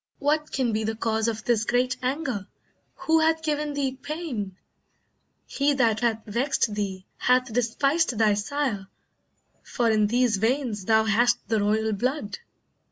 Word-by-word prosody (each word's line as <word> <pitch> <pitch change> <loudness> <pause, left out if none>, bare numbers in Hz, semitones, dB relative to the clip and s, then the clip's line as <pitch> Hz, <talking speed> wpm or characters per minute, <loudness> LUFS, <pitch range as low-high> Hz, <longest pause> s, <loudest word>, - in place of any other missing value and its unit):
What 300 +1 0
can 250 -4 0
be 220 +1 0
the 220 +1 -2
cause 220 0 0
Of 225 -1 -2
this 230 -3 +1
great 245 +3 +1
anger? 255 - -2 0.6
Who 320 0 +4
hath 320 0 +2
given 300 -1 -1
thee 270 -2 -1
pain? 275 - -5 0.9
He 285 +1 +1
that 230 -5 +2
hath 225 -2 0
vexed 235 0 0
thee, 195 -2 -4
hath 250 -1 +2
despised 265 +4 +1
thy 215 -1 +4
sire, 210 -2 -2 0.7
For 235 -2 0
in 215 -1 +3
these 240 -1 +2
veins 225 -2 -1
thou 220 +1 +4
hast 240 +3 +2
the 220 -1 +2
royal 215 +1 +1
blood." 240 -1 -2
235 Hz, 150 wpm, -25 LUFS, 215-275 Hz, 0.9 s, Who